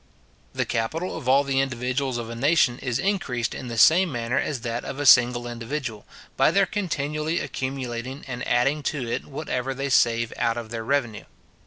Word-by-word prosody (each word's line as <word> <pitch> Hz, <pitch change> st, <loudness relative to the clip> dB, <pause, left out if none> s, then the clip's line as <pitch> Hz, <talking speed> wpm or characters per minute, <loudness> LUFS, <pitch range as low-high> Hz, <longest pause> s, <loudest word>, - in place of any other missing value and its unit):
The -, -, -1 dB
capital 155 Hz, +11 st, -2 dB
of 140 Hz, -6 st, -4 dB
all 135 Hz, +2 st, +5 dB
the 135 Hz, -1 st, 0 dB
individuals 130 Hz, 0 st, -2 dB
of 120 Hz, -1 st, -4 dB
a 115 Hz, -, -6 dB
nation 130 Hz, -1 st, +2 dB
is 125 Hz, -3 st, -2 dB
increased 140 Hz, -, -1 dB
in 130 Hz, -, -7 dB
the 115 Hz, -1 st, -5 dB
same 170 Hz, +10 st, +6 dB
manner 120 Hz, 0 st, -1 dB
as 135 Hz, -6 st, -2 dB
that 115 Hz, +1 st, -3 dB
of 135 Hz, -, -6 dB
a 145 Hz, -, -2 dB
single 120 Hz, -2 st, +6 dB
individual, 120 Hz, -1 st, -5 dB, 0.3 s
by -, -, +4 dB
their 195 Hz, 0 st, +3 dB
continually 155 Hz, -4 st, -2 dB
accumulating 130 Hz, 0 st, -4 dB
and 125 Hz, -1 st, -5 dB
adding 135 Hz, +5 st, +2 dB
to 135 Hz, -6 st, -4 dB
it 115 Hz, -, -3 dB
whatever 135 Hz, -3 st, -3 dB
they 135 Hz, +1 st, -3 dB
save 115 Hz, -3 st, +2 dB
out 115 Hz, 0 st, 0 dB
of 115 Hz, -1 st, -6 dB
their 115 Hz, -1 st, -4 dB
revenue. 120 Hz, -4 st, -1 dB
130 Hz, 185 wpm, -24 LUFS, 120-145 Hz, 0.3 s, same